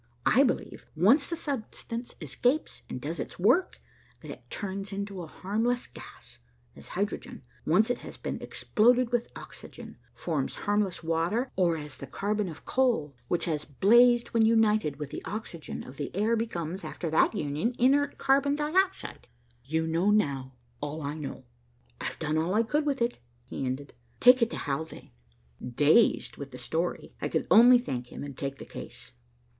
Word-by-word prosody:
I 265 - +5
believe, 270 - -1
once 230 - +4
the 335 - -1
substance 245 -5 -5
escapes 265 +6 -1
and - - -4
does - - -4
its - - -5
work, 370 0 +2 0.4
that - - -8
it - - -12
turns 195 0 -4 0.2
to 195 -3 -7
a 165 - -7
harmless 225 +9 -1
gas, - - -13 0.4
as - - -12
hydrogen, - - -3 0.2
once 210 +9 +4
it - - -2
has - - -10
been - - -5
exploded 245 +2 +2
with 240 -1 0
oxygen, - - -11 0.2
forms 155 -6 -2
harmless 205 -4 0
water, 165 +10 0
or 175 -3 +2
as 150 -2 -8
the 140 - -7
carbon 205 - -1
of 160 - -11
coal, 235 - +1
which 175 - 0
has 155 -4 -1
blazed 240 - +4
when 230 -1 +3
united 215 -8 +3
with 150 -2 -6
the - - -6
oxygen 200 -6 -6
of 130 - -12
the 145 - -3
air 215 +4 +2
becomes, 190 -5 -3
after 165 -3 -4
that 160 - +3
union, 150 - -1
inert 280 +3 +3
carbon 280 +1 +3
dioxide. 360 +6 0 0.4
You 160 +4 0
know, 165 +5 +1
now, 140 -11 +1 0.3
all 145 +2 -4
I 140 +1 -3
know. 150 -3 -6 0.6
I've - - -4
done 155 0 0
all 175 +5 0
I 225 - +4
could 295 +6 0
with 270 -4 +1
it," 240 +1 -2 0.3
he 130 +1 -4
ended, 135 +2 -4 0.3
"Take 250 0 +7
it 230 - +3
to - - -5
Haldane." 155 +3 -5 0.5
Dazed 145 - +3
with 140 -1 -7
the 125 - -10
story, 160 +8 -3
I - - 0
could - - -1
only 245 +3 +9
thank 125 - -4
him - - -8
and 140 -2 -7
take 140 0 -4
the - - -9
case. - - -9
200 Hz, 170 wpm, -28 LUFS, 150-240 Hz, 0.6 s, only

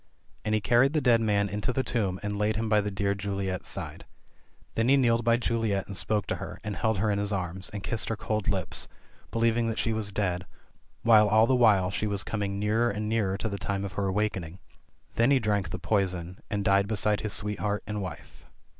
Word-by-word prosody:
And 110 0 +1
he 110 - +1
carried 120 +6 +4
the 155 - +3
dead 120 -4 +4
man 100 -2 +2
into 105 +4 -2
the 130 +1 0
tomb 100 -8 -1
and 105 0 -2
laid 105 +1 +1
him 110 +1 -1
by 105 -1 +4
the 105 - -2
dear 100 0 0
Juliet's 100 -1 -3
side. - - -6 0.7
Then 115 +2 +1
he 140 - +6
kneeled 120 -3 +3
by 115 0 +4
Juliet 115 -4 0
and 100 - -7
spoke 100 +4 0
to - - -2
her, - - -7
and 105 -1 -4
held 110 -3 0
her 105 +2 +1
in 100 - 0
his 100 0 -1
arms, 95 -1 -3
and 100 -1 -7
kissed 115 +1 -1
her 115 - 0
cold 105 -1 -2
lips, 95 -3 -1 0.4
believing 115 0 +1
that 115 - -2
she 115 - 0
was 110 -2 -2
dead, 90 -3 -1 0.6
while 110 -2 +6
all 110 +2 +5
the 130 - +2
while 105 -7 +4
she 105 +2 -1
was 100 -2 -1
coming 100 -2 -2
nearer 110 +4 +2
and 105 0 -3
nearer 105 -4 0
to 110 - -2
the 100 -2 -4
time 100 0 -2
of 95 - -6
her 100 0 -1
awakening. 95 -4 -2 0.6
Then 115 +2 +4
he 140 - +5
drank 105 -5 0
the - - -4
poison, 90 -4 -1
and 100 -1 -2
died 100 0 +4
be 110 - -1
side 105 +1 +1
his 105 -2 -3
sweetheart 105 0 -2
and 105 0 -3
wife. 95 - -9
105 Hz, 225 wpm, -28 LUFS, 100-110 Hz, 0.7 s, he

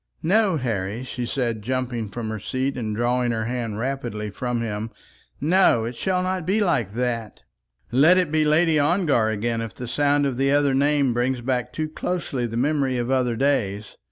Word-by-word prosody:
"No, 195 +1 +3
Harry," 115 -3 -2
she 125 -1 -5
said, 115 -5 -2
jumping 120 -2 -2
from 110 +2 -5
her 110 0 -4
seat 130 +6 -2
and 110 -4 -3
drawing 120 +1 +1
her 110 -1 -2
hand 115 -3 -3
rapidly 120 -4 -3
from 120 +2 -2
him; 110 -1 -3 0.5
"no; 155 -8 +3
it 120 +2 -5
shall 185 +6 0
not 185 -1 -1
be 195 +6 +1
like 145 - +1
that. 115 -2 -3 0.5
Let 150 +9 +5
it 180 -5 +1
be 155 0 +2
Lady 155 +1 +3
Ongar 145 - +2
again 115 +2 -1
if 115 -4 -6
the 125 - -6
sound 145 +3 +2
of 135 -3 -1
the 135 +1 +2
other 140 -1 +3
name 140 -1 +2
brings 125 +1 0
back 125 -2 -1
too 155 0 -3
closely 155 -6 -3
the 115 0 -5
memory 135 -1 +1
of 120 +1 -2
other 125 -3 +1
days. 110 -7 -1
125 Hz, 185 wpm, -23 LUFS, 115-145 Hz, 0.5 s, Let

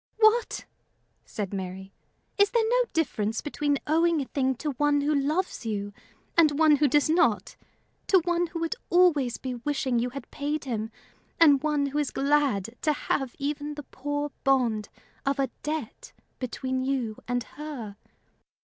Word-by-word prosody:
"What!" 445 +2 +3 0.6
said 205 -2 -5
Mary, 190 0 -6 0.5
"is 405 0 +6
there 460 -2 +2
no - - +3
difference 225 -9 0
between 290 -1 0
owing 330 +1 +3
a 275 - -2
thing 265 -1 0
to 295 +5 -3
one 290 +2 +2
who 295 +2 +1
loves 300 +5 0
you 205 -2 -3 0.4
and 310 -4 +5
one 310 -2 +6
who 295 +1 +4
does 290 +2 +3
not? 310 - +2 0.5
to 385 - +6
one 350 0 +1
who 330 0 -6
would 330 - 0 0.2
always 315 -9 +4
be 260 -1 -4
wishing 255 -1 -1
you 245 +2 0
had 270 0 -9
paid 295 +1 -2
him 225 -4 -3 0.5
and 290 -5 +6
one 300 -2 +1
who 280 +2 -1
is 295 - 0
glad 275 -7 +1
to 305 - +2
have 270 -3 -2
even 295 +1 -3
the 295 - -7
poor 290 +1 -3
bond 240 -6 +2 0.3
of 275 0 0
a 275 -1 0
debt 310 - -5 0.3
between 260 +1 -2
you 255 -5 -1
and 245 0 0
her? 270 -9 -7
285 Hz, 160 wpm, -27 LUFS, 245-310 Hz, 0.6 s, is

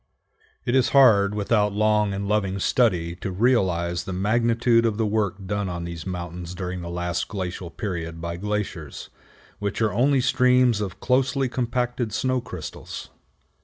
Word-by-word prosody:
It 120 - 0
is 130 -1 +3
hard 105 -6 +6
without 105 0 +1
long 105 0 +2
and 100 0 -3
loving 100 -2 0
study 90 -6 +1
to 95 - -4
realize 90 -5 +1
the - - -6
magnitude 115 +4 +2
of 110 -3 0
the 110 - +1
work 100 -2 -1
done 100 0 -2
on 85 -1 -4
these 85 0 -6
mountains 90 -1 -5
during 90 -1 -4
the 85 - -6
last 90 0 -2
glacial 90 -3 -5
period 85 -5 -5
by 85 0 -4
glaciers, 100 -6 -4 0.5
which 100 -1 -3
are 110 -2 +1
only 135 +5 +3
streams 125 -3 +3
of 100 -3 -5
closely 130 +1 +1
compacted 125 -2 -2
snow 130 +1 0
crystals. 90 - -8
100 Hz, 155 wpm, -24 LUFS, 90-115 Hz, 0.5 s, hard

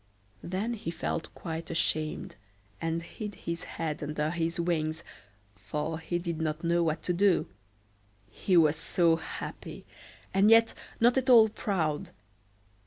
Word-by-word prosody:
Then 195 +6 -2
he 210 -7 -5
felt 165 0 -3
quite 165 -1 -5
ashamed, 155 -1 -1 0.5
and 165 0 -1
hid 210 +3 -7
his 170 0 -5
head 160 -2 -2
under 150 +1 -1
his 170 0 -2
wings, 160 -1 -1 0.5
for 150 - -4
he 170 +2 -2
did 170 -2 -3
not 155 +1 -2
know 170 0 +2
what 160 -1 0
to 180 - 0
do; 190 +1 +3 0.8
he 180 - +1
was 155 -2 +5
so 165 -1 +2
happy, 160 - -7 0.5
and 195 +2 +5
yet 225 0 +6 0.3
not 240 +3 +5
at 260 - -3
all 225 -3 +8
proud. 165 -8 -1
170 Hz, 140 wpm, -29 LUFS, 160-190 Hz, 0.8 s, all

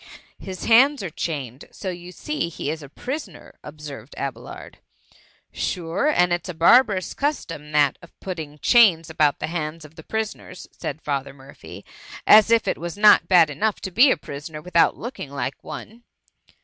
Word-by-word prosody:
'^ - - -20 0.4
His 185 -1 -7
hands 260 +3 +5
are 175 - -5
chained, 140 -6 -5
so 190 - -5
you 175 0 -9
see 300 - -4
he 155 -3 -4
is 160 0 -6
a 140 - -11
prisoner 245 - -8
;" - - -56
observed 145 -4 -10
Abelard. 130 -4 -7 0.3
^' - - -30 0.4
Sure, 175 - -2
and 180 -12 +3
it 175 - -1
*8 - - -9
a - - -4
barbarous 190 +2 +4
custom 165 - -3
that 145 -2 +2
of 170 - -18
putthing 160 -6 -7
chains 175 -10 +5
about 150 -2 +2
the - - -3
hands 160 -1 -5
of 155 - -15
the 160 -1 -13
pri 220 +6 -1
soners,^ 205 -4 -9
said 150 +2 -7
Father 140 -2 -3
Murphy, 135 0 -13
^' - - -21 0.3
as 215 +1 +7
if 230 -1 +3
it - - -1
was 170 +3 -6
not 210 0 +6
bad 170 -5 +5
enough 205 +9 -1
to 190 - -5
be 245 +10 +6
a - - +2
prisoner 150 +2 -8
without 170 +1 +2
looking 235 - -7
like 140 -1 -5
one.'' 230 +3 -9
170 Hz, 190 wpm, -23 LUFS, 150-210 Hz, 0.4 s, as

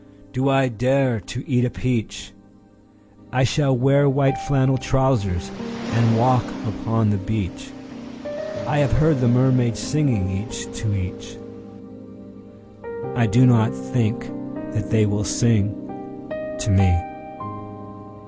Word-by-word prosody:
Do 130 +2 +1
I 135 -1 +3
dare 125 +1 +1
to 120 +7 -8
eat 125 -3 +2
a 125 - +1
peach?I 105 0 -6
shall 135 +1 +2
wear 140 +3 +4
white 135 -1 +2
flannel 130 0 +1
trousers, 110 -9 0 0.4
and 115 0 +3
walk 125 +1 +3 0.2
upon 110 -1 0
the 100 - 0
beach.I 265 - -5
have 140 -4 +2
heard 155 +3 +3
the 125 - +3
mermaids 125 -2 +3
singing, 130 -8 0 0.2
each - - -7
to 110 -2 -2 2.2
each.I 115 -2 +2
do 125 +3 +5
not 115 - +4
think 105 - -2 0.4
that 105 -1 -3
they 110 -1 +3
will 105 0 -1
sing 105 -1 +2 0.9
to - - -1
me. 95 -1 +4
120 Hz, 110 wpm, -22 LUFS, 105-135 Hz, 2.2 s, do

